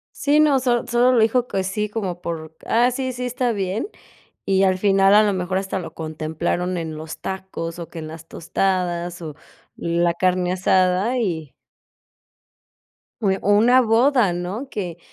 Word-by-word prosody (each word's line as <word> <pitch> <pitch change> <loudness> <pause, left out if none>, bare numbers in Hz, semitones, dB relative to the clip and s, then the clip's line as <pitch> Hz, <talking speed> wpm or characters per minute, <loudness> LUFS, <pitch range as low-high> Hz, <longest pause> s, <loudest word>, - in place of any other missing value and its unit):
Sí, 290 +1 +2
no, 295 -3 +4
solo 245 -2 0
solo 245 +2 +3
lo 245 - +3
dijo 240 +3 +2
que 190 - -2
sí, 210 +3 -2
como 195 -5 -4
por: 160 -2 -6
"Ah, 240 +2 +3
sí, 260 +1 -3
sí, 250 +1 -5
está 250 0 -1
bien", 200 - -2 0.6
y 195 0 +2
al 185 -1 +3
final 195 0 +4
a 215 - +7
lo 205 -2 +1
mejor 185 0 -2
hasta 190 0 -2
lo 165 -3 -8
contemplaron 160 +3 -3
en 160 -2 -4
los 155 +1 -8
tacos 185 -3 -5
o 170 - -6
que 165 - -8
en 155 - -6
las 160 +1 -10
tostadas 175 0 -2
o 155 -3 -7 0.4
la 170 0 0
carne 180 0 +1
asada 185 +5 +2
y 160 - -3 1.7
o 195 0 +1
una 245 +5 +5
boda, 235 -2 +3
¿no?, 185 +10 -4
que 175 -4 -5
190 Hz, 165 wpm, -22 LUFS, 170-225 Hz, 1.7 s, a